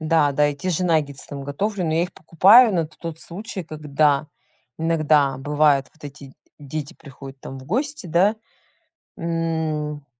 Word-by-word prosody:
Да-да, 150 -2 +2
и 145 - -3
те 185 +6 -4
же 180 +1 0
наггетсы 150 -5 0
там 140 -1 -7
готовлю, 190 +7 -2
но 160 -1 0
я 165 - +2
их - - -19
покупаю 210 +8 +6
на 170 -4 0
т 155 - -22
тот 165 -1 -6
случай, 195 +2 -7
когда 150 -1 0 0.5
иногда 155 -4 +2
бывает 145 -1 +2
вот 155 - -18
эти 140 -1 -10 0.3
дети 145 0 -6
приходят 135 -1 -12
там 135 - -8
в 130 - -12
гости, 265 - -2
да, 185 +7 +2 0.8
м, 160 -3 -2
155 Hz, 160 wpm, -22 LUFS, 145-170 Hz, 0.8 s, покупаю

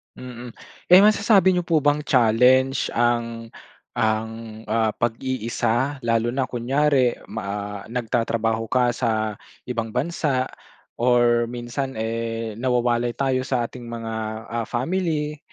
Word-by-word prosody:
Mm. 125 -1 -9 0.4
Eh 180 - +10
masasabi 205 -3 +5
niyo 180 - 0
po 165 -2 +2
bang 145 +1 +1
challenge 130 +1 +3
ang 115 -1 0 0.5
ang 110 0 -2
ah, 110 0 +1
pag-iisa 120 +3 -1
lalo 115 0 +1
na 135 - +1
kunyari 130 +1 +1 0.2
ma 100 0 -4
ah, - - -10
nagtatrabaho 115 -1 -1
ka 125 0 +2
sa 110 -3 -1 0.3
ibang 115 -2 -2
bansa 135 -2 0 0.5
or 120 -1 +3
minsan, 120 +2 -4
eh, 115 0 -3
nawawalay 120 -2 +1
tayo 130 -2 +1
sa 125 -3 0
ating 120 0 -10
mga 115 -1 -5 0.4
ah, 115 -1 -2
family 150 +2 -2
120 Hz, 120 wpm, -23 LUFS, 115-130 Hz, 0.5 s, Eh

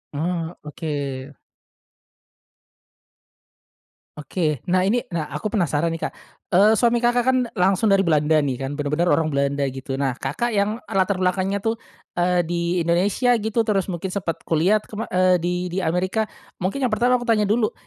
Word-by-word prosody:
Ah, 165 +2 -2
oke. 145 -3 -5 2.8
Oke. 150 -3 -2
Nah 185 +1 +3
ini, 240 +5 +2
nah 165 -3 -2
aku 215 +7 -4
penasaran 170 - 0
nih 165 0 -3
Kak. - - -4 0.4
Eee, 205 +4 +6
suami 235 0 +3
Kakak 240 0 +2
kan 260 0 +3 0.2
langsung 190 +4 +3
dari 195 -1 +4
Belanda 155 -1 +3
nih 135 -3 -1
kan 140 +2 -4
bener-bener 150 +4 0
orang 160 - +3
Belanda 140 0 0
gitu. 135 0 -4
Nah, 135 -2 0
Kakak 165 - -2
yang 205 +2 +1
latar 190 0 +1
belakangnya 185 +2 0
tuh, 225 +3 -1 0.4
eee, 175 0 +1
di 170 +1 -1
Indonesia 195 +9 +2
gitu 220 +1 0
terus 200 -3 0
mungkin 180 +1 -4
sempat 175 -5 -2
kuliah 170 +6 +3
kema 215 +1 -7
eee, 185 -1 +3
di 175 +1 0
di 180 +2 -2
Amerika, 185 +6 0 0.3
mungkin 255 +9 -1
yang 230 - 0
pertama 245 +3 +3
aku 240 - -6
tanya 210 -4 +2
dulu. 220 0 +1
180 Hz, 160 wpm, -22 LUFS, 155-210 Hz, 2.8 s, Eee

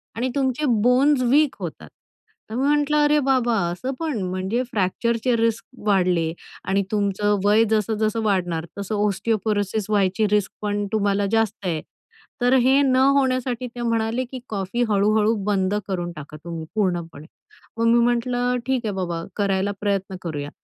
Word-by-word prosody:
आणि 250 +3 -1
तुमचे 270 +2 0 0.2
bones 255 +3 +4
weak 275 +3 +3
होतात. - - -7 0.6
तर 220 - -5
मी 265 +3 +1
म्हटलं 295 0 +2
"अरे 295 +1 +4
बाबा 255 -4 +2 0.2
असं 220 +10 -4
पण." 310 -7 -2
म्हणजे 185 +6 -1
फ्रॅक्चरचे 230 +5 0
रिस्क 230 0 0 0.2
वाढले 180 -5 +2 0.3
आणि 195 +1 +1
तुमचं 205 0 +1
वय 215 +2 +5
जसं 220 0 +1
जसं 215 +1 0
वाढणार 175 -5 0
तसं 200 +2 -3
ऑस्टिओपोरोसिस 210 0 -1
व्हायची 205 +1 +2
रिस्क 210 -2 +1
पण 205 -1 -1
तुम्हाला 205 -1 +1
जास्त 225 -2 +1
आहे. 160 -3 -1 0.6
तर 245 +1 +3
हे 265 +2 +4
न 260 -2 +3 0.2
होण्यासाठी 255 -2 0
ते 240 0 -8
म्हणाले 230 +1 0
की 260 - -5
"कॉफी 200 +3 -2
हळू-हळू 210 +2 +3
बंद 195 -1 +1
करून 175 -2 -3
टाका 150 +1 -9
तुम्ही 165 -2 -6
पूर्णपणे." 175 -7 -2 0.5
मग 230 - +1
मी 235 +1 +5
म्हटलं 245 +1 +1
"ठीक 260 -3 -1
आहे 205 - -1
बाबा 170 -3 -3
करायला 200 -1 0
प्रयत्न 195 -2 -1
करूया." 145 -4 -4
215 Hz, 155 wpm, -23 LUFS, 195-245 Hz, 0.6 s, वय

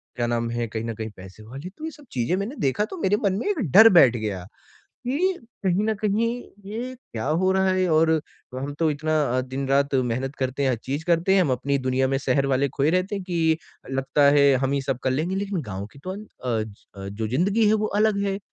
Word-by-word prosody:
क्या 120 - -1
नाम 115 0 -1
है 120 -1 -2
कहीं 110 +1 -4
न 115 - -3
कहीं 110 0 -5
पैसे 95 +3 -12
वाले 135 +11 -8
तो 315 - -6
ये 320 - -4
सब 295 -1 -16
चीज़ें 125 +8 0
मैंने 215 +9 -4
देखा 135 +9 +1
तो 370 - -8
मेरे 205 +2 +2
मन 195 - +2
में - - -3
एक 380 -8 0
डर 220 +6 +9
बैठ 130 -9 +7
गया 105 -4 -3 0.6
कि 335 +9 +1 0.3
कहीं 190 +3 +2
न 220 0 +1
कहीं 215 +3 +2 0.4
ये 240 +5 -5
क्या 120 - -7
हो 185 0 +3
रहा 190 0 +2
है 185 0 +1
और 160 +1 +4 0.4
हम 135 +3 -4
तो 160 -2 +2
इतना 155 +1 0 0.2
अ, - - +3
दिन-रात 135 +2 0
मेहनत 130 +2 -1
करते 130 +1 -2
हैं, 135 - +3
हर 125 - 0
चीज़ 140 +7 -4
करते 175 +2 +3
हैं 195 - +5
हम 145 - 0
अपनी 140 +2 0
दुनिया 130 0 +1
में 135 - +1
शहर 135 0 +1
वाले 135 +1 +1
खोए 145 +2 +3
रहते 185 +4 0
हैं 195 -2 -4
कि 165 -3 +1 0.3
लगता 135 +2 0 0.2
है 140 -1 +6
हम 135 - 0
ही 140 - +1
सब 135 -2 -2
कर 130 - +1
लेंगे 165 +8 -1
लेकिन 200 -3 -2
गाँव 100 0 -5
की - - -15
तो 185 - -4
अंत 210 +2 -9 0.2
अ, 115 -3 0
ज 110 -1 -9 0.2
अ, 95 0 -6
जो 110 +2 -4
ज़िंदगी 195 - +2
है 215 - +4
वो 215 0 +1
अलग 215 -2 +3
है। 195 0 -1
145 Hz, 245 wpm, -24 LUFS, 130-195 Hz, 0.6 s, डर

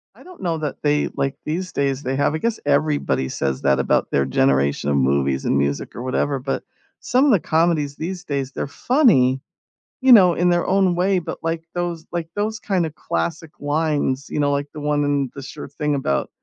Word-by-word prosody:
I - - -17
don't 365 -1 -14
know 170 -3 -1
that 150 -2 -3
they 145 0 +2
like, 135 0 -1
these 180 +4 -3
days, 140 0 -1
they 130 +1 -1
have 145 +2 +1
I - - 0
guess 230 +3 -1
everybody 145 - +1
says 70 -1 -2
that 70 -1 +2
about 70 - +1
their 70 - +2
generation 70 +2 +1
of 70 - +2
movies 70 0 +1
and - - +2
music, 70 0 -1
or 120 - -6
whatever, 135 +2 0
but 135 +1 -3 0.4
some 255 +3 +2
of 285 - +4
the 205 - +5
comedies 160 -2 +1
these 175 +4 -5
days, 140 -2 -3
they're - - -4
funny, 140 - +3 0.6
you 260 -1 +5
know, 185 -6 +8
in 175 +1 +2
their 175 0 +2
own 190 -2 +3
way, 185 +1 +2
but, - - -6
like, 165 0 -2
those 175 -2 -3
like, 170 -2 -3
those, 215 +1 -2
kind 185 -5 0
of, 155 - -6
classic 85 - -3
lines, 145 -2 0
you - - -3
know, 145 -1 +2
like 140 0 -1
the 150 - -7
one 145 0 +1
in 140 -2 0
The 140 - -7
Sure 135 - -8
Thing, 150 0 -1
about, 70 - -1
150 Hz, 210 wpm, -21 LUFS, 130-175 Hz, 0.6 s, know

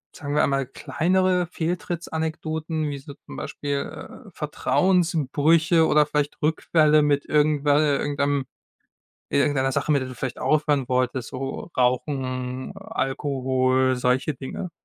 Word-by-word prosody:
sagen 145 -1 -5
wir 150 - +4
einmal, 135 -1 +1
kleinere 180 +8 +1
Fehltritts-Anekdoten, 160 -2 -3
wie 140 - -4
so 140 +1 -10
zum 140 - -13
Beispiel, 140 -1 -5
äh, - - -11
Vertrauensbrüche 165 -2 +2
oder 150 -1 +4
vielleicht 150 -1 -2
Rückfälle 155 0 +3
mit 145 -1 +1
irgendwe 150 -1 +2
äh, 145 -1 +3
irgendeinem 140 -1 0 0.9
in - - +3
irgendeiner 140 -2 +2
Sache, 150 - 0
mit 140 - +3
der 130 - -5
du 130 - -8
vielleicht 130 0 -4
aufhören 150 -4 +1
wolltest, 125 -1 0
so 135 +6 -5
Rauchen, 130 0 -1
Alkohol, 130 -8 0
solche 125 +4 0
Dinge. 135 +7 -6
145 Hz, 130 wpm, -24 LUFS, 130-160 Hz, 0.9 s, wir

